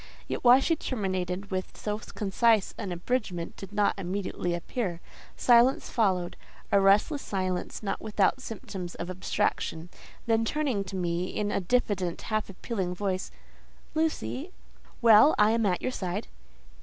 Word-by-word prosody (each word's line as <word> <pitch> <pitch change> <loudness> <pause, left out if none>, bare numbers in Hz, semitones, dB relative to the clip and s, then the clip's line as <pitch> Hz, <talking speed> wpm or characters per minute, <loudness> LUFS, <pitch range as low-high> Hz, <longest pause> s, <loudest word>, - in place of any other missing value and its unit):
Yet - - -4
why 250 +1 +8
she 330 +4 +2
terminated 190 - -3
with 185 0 -4
so 210 0 -3
concise 215 +1 +1
an 195 - -5
abridgment 175 -2 -2
did 195 -1 -9
not 205 0 +2
immediately 185 -2 -2
appear; 175 0 -3 0.4
silence 245 +2 +4
followed—a 195 -2 0
restless 205 +9 +4
silence, 185 0 -3
not 195 - -2
without 215 +4 +1
symptoms 190 -6 -6
of 175 +1 -5
abstraction. 175 -2 -2 0.4
Then, 225 -1 +2
turning 255 -4 0
to 190 - -7
me, 175 -1 -1
in 205 +1 -2
a - - +1
diffident, 190 -4 0
half 215 -1 0
appealing 190 -2 -3
voice—"Lucy—" 260 - -4 0.5
"Well, 230 +6 +8
I 210 +1 +5
am 225 -2 +2
at 180 -2 0
your 255 - 0
side." 190 -2 -3
200 Hz, 135 wpm, -28 LUFS, 185-230 Hz, 0.5 s, why